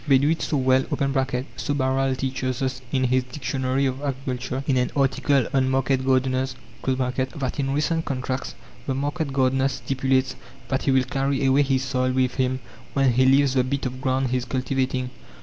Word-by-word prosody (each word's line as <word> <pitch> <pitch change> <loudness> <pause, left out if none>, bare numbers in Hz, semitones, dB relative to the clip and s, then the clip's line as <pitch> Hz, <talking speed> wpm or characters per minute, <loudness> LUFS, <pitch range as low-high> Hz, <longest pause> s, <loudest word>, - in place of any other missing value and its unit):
They 135 -2 +6
do 145 +4 +2
it 165 - -1
so 150 - 0
well 130 0 +3 0.7
(so 145 - -1
Barral 135 0 +1
teaches 130 -1 -2
us, 130 0 -2
in 130 -1 +1
his 130 0 +2
"Dictionary 130 0 -1
of 130 +1 -2
Agriculture," 130 -2 -3
in 135 - +1
an 125 - +1
article 135 -1 +2
on 130 -1 +2
market 130 0 +1
gardeners) 130 0 +1 0.3
that 130 +1 -1
in 135 -1 0
recent 155 +3 0
contracts, 130 -2 -3 0.3
the 135 - 0
market 145 +2 -2
gardener 135 0 +2
stipulates 130 0 0 0.3
that 130 - 0
he 135 - +1
will 130 -1 +4
carry 135 +1 -1
away 135 +2 +4
his 135 -2 +1
soil 130 -1 0
with 130 -1 +1
him 130 0 0 0.3
when 135 -3 +3
he 130 +2 +4
leaves 135 0 +4
the 130 -2 +3
bit 140 +2 -2
of 130 0 -4
ground 130 -1 0
he 130 - +2
is 125 - -3
cultivating. 130 0 -1
130 Hz, 185 wpm, -24 LUFS, 130-135 Hz, 0.7 s, They